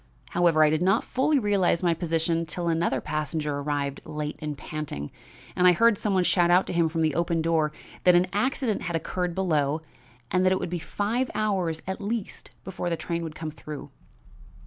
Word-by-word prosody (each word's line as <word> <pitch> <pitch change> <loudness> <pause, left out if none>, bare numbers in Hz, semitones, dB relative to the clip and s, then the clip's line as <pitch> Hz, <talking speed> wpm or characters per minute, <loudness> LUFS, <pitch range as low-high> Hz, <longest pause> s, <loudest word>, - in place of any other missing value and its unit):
However, 170 -3 +4
I 150 - +4
did 155 +1 +1
not 195 +5 +3
fully 285 +3 +1
realize 200 -7 +2
my 170 -1 +3
position 165 0 0
till 170 +2 -4
another 165 +1 +1
passenger 150 -1 -2
arrived 140 -1 -2
late 150 0 -4
and 150 -2 -4
panting, 145 - -5 0.4
and 180 - +4
I 180 - +7
heard 230 +5 +4
some 200 0 -1
one 185 - +3
shout 175 -1 +3
out 180 +2 +5
to - - -4
him 170 -1 +2
from 165 0 -1
the 155 -2 +2
open 165 0 0
door 160 -2 +2 0.3
that 180 -1 +6
an 175 +1 +5
accident 245 +1 0
had 170 -1 -3
occurred 175 +1 -2
below 155 -5 +1 0.5
and 185 +1 +2
that 185 - +4
it 190 - +2
would 175 - -4
be 175 - -2
five 220 +9 -1
hours 185 -7 0
at 190 +2 -4
least 215 +1 -4
before 180 -2 -4
the 170 - -1
train 170 0 -3
would 160 -2 -6
come 155 0 -5
through. 150 -1 -9
170 Hz, 200 wpm, -26 LUFS, 155-185 Hz, 0.5 s, I